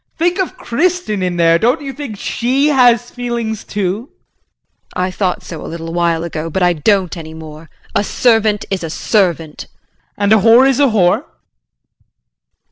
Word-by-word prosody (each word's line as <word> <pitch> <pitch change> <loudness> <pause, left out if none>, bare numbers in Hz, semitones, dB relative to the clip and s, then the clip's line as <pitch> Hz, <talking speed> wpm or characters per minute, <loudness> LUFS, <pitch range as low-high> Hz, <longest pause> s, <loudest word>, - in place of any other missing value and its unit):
Think 350 +3 0
of 375 - -2
Kristin 320 - -1
in 180 -1 -1
there, 165 0 +4
don't 245 - +1
you 275 -1 -5
think 270 -8 -7
she 260 +8 0
has 245 -4 +3
feelings 235 -3 -4
too? 205 +5 -3 0.9
JULIE. 180 - 0
I 185 - -3
thought 185 -1 -2
so 165 - -8
a - - -7
little 165 0 -6
while 170 -1 0
ago, 165 -1 -4
but 185 +3 -1
I 175 0 +4
don't 185 +3 +1
any 160 -2 -9
more. 160 0 -11 0.2
A 205 - +1
servant 220 -2 +1
is 190 -3 -2
a 165 - -4
servant. 170 -4 -1
JEAN. - - -43
And 205 +1 +3
a - - +6
whore 230 +5 +6
is 270 -1 +1
a 285 - +5
whore. 190 -7 +2
205 Hz, 175 wpm, -16 LUFS, 170-245 Hz, 0.9 s, a